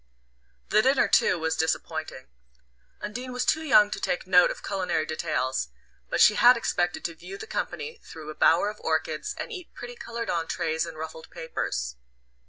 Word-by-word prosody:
The 215 - +5
dinner 265 +3 +3
too - - +4
was 160 0 -1
disappointing. 160 -3 -2 0.8
Undine 245 +5 -5
was 250 0 -2
too 315 - +2
young 215 -9 +5
to - - -3
take 180 - -2
note 180 -1 +6
of - - -6
culinary 180 -5 -1
details, 155 - -1 0.4
but - - -1
she 215 - +8
had 245 +3 +7
expected 175 -6 -1
to 170 - -2
view 180 +4 -9
the - - -7
company 460 0 -4
through 155 -1 -9
a - - -7
bower 175 +7 +3
of 210 - -15
orchids - - -2
and - - -5
eat 365 -6 -9
pretty 245 0 -8
coloured 235 -1 -5
entrees 165 -1 -1
in 165 - -8
ruffled 160 0 -8
papers. - - -4
180 Hz, 175 wpm, -26 LUFS, 160-235 Hz, 0.8 s, she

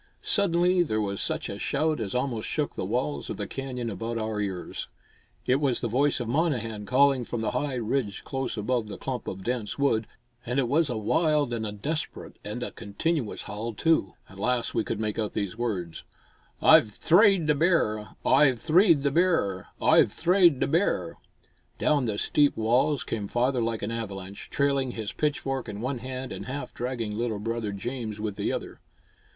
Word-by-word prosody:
Suddenly 180 -2 +3
there 110 -11 0
was 100 -2 -1
such - - -1
a - - -6
shout 155 +2 0
as 105 -2 -3
almost 125 -4 -1
shook - - -1
the - - -4
walls 70 -1 -2
of - - -4
the - - -3
canyon 130 -3 -5
about 115 +2 -3
our 110 -1 -2
ears. 95 -3 -4 0.6
It 130 - +3
was 135 -4 +1
the 120 - -1
voice 135 +6 +2
of 120 - -3
Monnehan 115 -7 -1
calling 135 0 +4
from 120 -1 -4
the 110 - -1
high 135 +2 -1
ridge 115 -4 -2
close 135 -3 -3
above 115 +1 -1
the 105 - -7
clump 130 -2 -4
of 95 0 -5
dense 120 -2 -2
wood; 115 -6 +1 0.4
and 125 +1 -3
it 135 -3 +2
was 150 +4 +2
a 120 - -2
wild 150 +4 +1
and 110 -2 -2
a - - -4
desperate 145 +10 -4
and 105 +4 -4
a - - -4
continuous 115 +5 -2
howl, 110 +2 -5
too. 160 - +1
At 95 - -14
last 125 +2 0
we 115 - +1
could 110 - -3
make 110 0 -2
out 105 -2 -2
these 100 -2 -2
words: 100 -8 -3 0.6
"Oi've 110 - +7
thrade 185 - +4
the 150 - +4
bear! 140 -10 +1 0.2
Oi've 135 -1 +5
thrade 165 - +4
the 140 - +2
bear! 160 - +1
Oi've - - +5
thrade 175 - +4
the - - +2
bear!" 140 - 0 0.6
Down 145 -4 +2
the 105 -3 -1
steep 145 +6 +2
walls 125 +6 +2
came 105 -3 -3
father 125 +3 +1
like 115 -1 -2
an 105 - -2
avalanche, 100 -4 -6
trailing 140 -3 +1
his 110 -3 -4
pitchfork 135 -4 -2
in 105 -1 -6
one 130 +2 -2
hand 130 +1 -6
and - - -6
half 140 +3 -5
dragging 120 -4 -3
little 115 -1 -1
brother 115 0 -3
James 110 +1 -5
with 105 -2 -3
the - - -1
other. - - -5
120 Hz, 190 wpm, -27 LUFS, 110-140 Hz, 0.6 s, Oi've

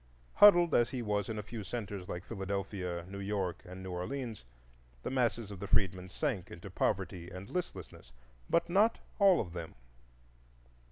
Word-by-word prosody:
Huddled 175 -5 +8
as 120 - +4
he 125 -2 -3
was 105 -2 0
in 110 - -3
a 105 - -3
few 110 0 -6
centres 100 -3 -5
like 90 - -4
Philadelphia, 95 -4 -3
New 100 +1 -7
York, 100 -3 -2
and 90 +1 -8
New 95 - -5
Orleans, 110 - -4 0.6
the - - -3
masses 120 -4 0
of 100 - -7
the 100 - -5
freedmen 95 -4 +1
sank 105 - -2
into - - -9
poverty 85 -1 -1
and 95 +2 -9
listlessness; 180 - -5 0.4
but 170 - +3
not 205 +6 +4 0.2
all 195 -3 +7
of 85 -5 -3
them. 85 -2 -6
100 Hz, 165 wpm, -33 LUFS, 90-120 Hz, 0.6 s, Huddled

